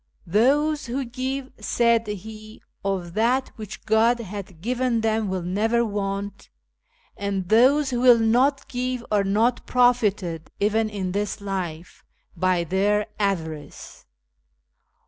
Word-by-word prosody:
" - - -39
Those 285 - +2
who 260 +3 -2
give," 260 +2 -4
said 230 +1 +2
he, 215 +2 -8
" - - -48
of 185 -3 -2
that 245 +5 +1
which 215 -3 -9
God 225 +2 +3
hath 195 -5 -8
given 245 +3 0
them 220 -2 0
will 185 -2 -2
never 220 +6 +1
want, 200 -1 -4 0.7
and 195 -2 -3
those 265 +6 +4
who 245 - -1
will 250 -2 +7
not 250 +5 +2
give 250 -1 -3
are 205 -1 +3
not 220 +5 +1
profited, 210 -10 +1
even 215 +2 +1
in 195 -3 -3
this 205 +2 -2
life, 180 -4 -5 0.3
by 185 0 +1
their 205 +4 +1
avarice. 160 -7 -4
215 Hz, 130 wpm, -24 LUFS, 195-245 Hz, 0.7 s, will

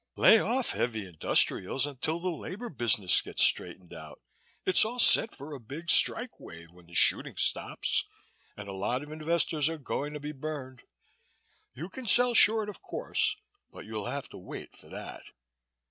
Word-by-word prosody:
Lay 225 - +7
off 245 +3 +1
heavy 110 -4 -2
industrials 95 - +1
until 145 +4 -2
the 185 +2 -2
labor 190 +8 -7
business 110 - +3
gets - - +1
straightened 90 -2 +1
out. 80 -2 -11 0.5
It's 185 - +5
all 230 +3 -3
set 230 -2 +5
for 145 +2 -9
a 140 - -7
big 145 +9 -4
strike 245 +2 +2
wave 85 0 -12
when 90 -1 -19
the 85 - -11
shooting - - +3
stops - - -1 0.5
and 105 -1 -8
a 100 - -6
lot 120 +8 -2
of 150 - -11
investors 155 -1 +1
are 165 - -4
going 145 0 -4
to 150 - -6
be 145 +1 -6
burned. 135 -3 -7 0.9
You 155 +7 -6
can 245 +5 -8
sell 245 +2 +5
short 220 -1 +4
of 210 - -9
course 440 -1 -1 0.4
but - - -11
you'll 105 -2 -5
have - - -4
to - - -11
wait - - -9
for - - -13
that. - - -8
150 Hz, 175 wpm, -29 LUFS, -, 0.9 s, Lay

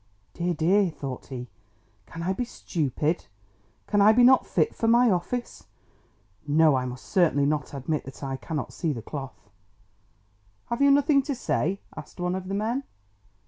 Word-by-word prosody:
"Dear, 175 0 -1
dear!" 185 +5 +3
thought 140 -5 -7
he, 125 -2 -6 0.6
"can 165 - -7
I 190 +2 0
be 220 - -2
stupid? 155 - -2 0.6
Can 205 -1 +2
I 210 +2 +7
be 245 +2 +5
not 255 +1 +6
fit 160 - +1
for 225 - -1
my 235 0 +5
office? 190 +7 -3 0.8
No, 155 +1 +5
I 130 -1 0
must 125 0 -7
certainly 165 -7 +2
not 150 0 -1
admit 140 +3 -2
that 135 +1 -10
I 135 -1 -3
cannot 150 +1 -5
see 160 -3 -1
the 115 -4 -7
cloth!" 135 -8 -8 1.2
"Have 235 +3 -2
you 280 - +6
nothing 280 0 +4
to 280 0 -3
say?" 195 -5 -1
asked - - -10
one 180 0 -1
of 185 0 -4
the 195 - -2
men. 230 +6 -1
175 Hz, 170 wpm, -26 LUFS, 145-220 Hz, 1.2 s, I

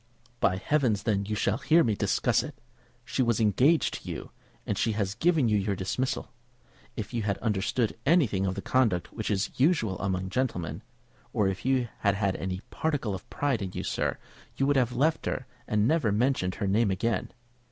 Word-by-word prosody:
"By 95 - +3
heavens, 115 -2 +1
then, 100 -3 +1
you 105 - -1
shall 105 +1 0
hear 165 +2 +4
me 115 - +1
discuss - - +2
it! - - -8 0.5
She - - -1
was 115 -2 +2
engaged 125 - +3
to - - -9
you, - - -6 0.3
and - - -1
she 110 - +1
has 100 -2 -1
given 155 +2 +2
you 105 -2 +3
your 100 0 -1
dismissal. 110 +8 -2 0.6
If 110 +1 -5
you 120 - 0
had 100 -2 -1
understood 110 +2 0
anything 130 - +3
of 95 - -1
the - - -5
conduct 110 -10 +1
which 110 - -3
is 100 -1 0
usual 130 - +2
among 95 -2 -1
gentlemen, 90 - -2 0.5
or 105 - +2
if 95 +3 -5
you 130 -2 +2
had 100 -2 +2
had 100 -2 0
any 95 0 -3
particle 145 -10 -1
of 95 - -8
pride 140 -6 0
in 95 -2 -4
you, - - -4
sir, - - -1 0.4
you 135 - +2
would 145 +1 +2
have 125 -2 +2
left 155 +5 +1
her 130 - -2 0.2
and 105 0 +2
never 150 -7 +2
mentioned 105 -4 +1
her 100 - -2
name 105 +2 +3
again. 110 +4 -1
110 Hz, 195 wpm, -28 LUFS, 100-130 Hz, 0.6 s, hear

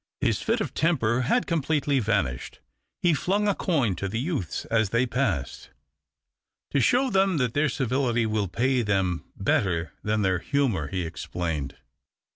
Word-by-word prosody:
His - - +1
fit - - 0
>f - - -3
temper 130 -7 +1
had 245 - +2
completely 150 -3 +1
vanished. 100 - -1 0.4
He 175 -2 +4
flung 200 +7 0
I 205 - +3
coin 140 - 0
to 100 - -2
the 110 +4 -3
youths 135 - -3
as 110 -3 +1
they 115 +4 +2
passed. 120 - -2 1.0
"To 140 - +2
show 250 - +3
them 190 -3 +3
that 125 -4 0
their 145 +1 +2
civility 125 -2 0
will 105 -2 0
pay 125 +7 +1
^hem 95 -4 0
better 85 -5 0
than 105 0 0
their 95 -2 +1
humour," 120 - 0
he 90 +4 -3
explained. 80 -4 -4
120 Hz, 155 wpm, -26 LUFS, 95-145 Hz, 1.0 s, He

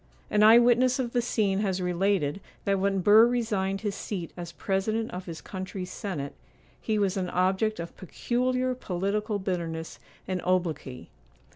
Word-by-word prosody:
An 210 - +3
eye 220 +2 +9
witness 245 +1 +4
of 245 -3 -2
the 245 - +2
scene 205 -5 0
has 190 -3 0
related 180 -2 0 0.2
that 195 -1 +2
when 195 0 +1
Burr 215 +5 +7
resigned 205 -5 -1
his 205 -2 -2
seat 185 -4 -5
as 175 -1 -7
president 215 +5 -1
of 180 +1 -7
his 165 -2 -7
country's 185 -1 -6
senate, 165 -11 -4 0.5
he 220 -1 0
was 200 -1 +1
an 185 -2 -1
object 190 +4 +1
of 170 0 -6
peculiar 255 +6 -1
political 205 0 -2
bitterness 170 -4 -4 0.3
and 185 -1 -2
obloquy. 170 -8 -2
195 Hz, 155 wpm, -27 LUFS, 180-220 Hz, 0.5 s, eye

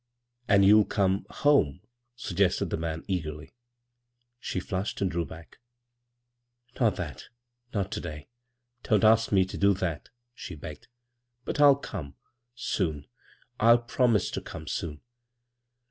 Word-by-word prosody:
"And 100 -3 +5
you'll 105 +1 +7
come 95 -2 0
— - - -34 0.2
home?" 90 - +4 0.3
suggested 95 -4 0
the - - 0
man, 80 0 -4
eagerly. 80 -5 -4 0.9
She - - -3
flushed 95 0 -3
and 95 -2 0
drew 85 0 -1
back. 80 0 -13 0.6
" 120 0 -27
Not 110 -6 +3
that 80 -8 -6 0.2
— 120 0 -41
not 100 -2 -1
to - - -3
day 75 -3 -7 0.6
1 105 -3 +4
Don't - - -4
ask 115 +1 +5
me 95 -2 +4
to 95 - -7
do 100 0 +4
that," 85 -5 -3 0.2
she 90 - -8
begged. 75 0 -9 0.3
" 120 0 -49
But - - -3
I'll 145 -1 +8
come 85 - -7 0.4
soon 80 -11 -2 0.3
— - - -35
I'll 115 +2 +7
promise 120 -3 +1
to - - -3
come 80 -1 -9
soon." 75 -2 -4
100 Hz, 155 wpm, -28 LUFS, 85-120 Hz, 0.9 s, I'll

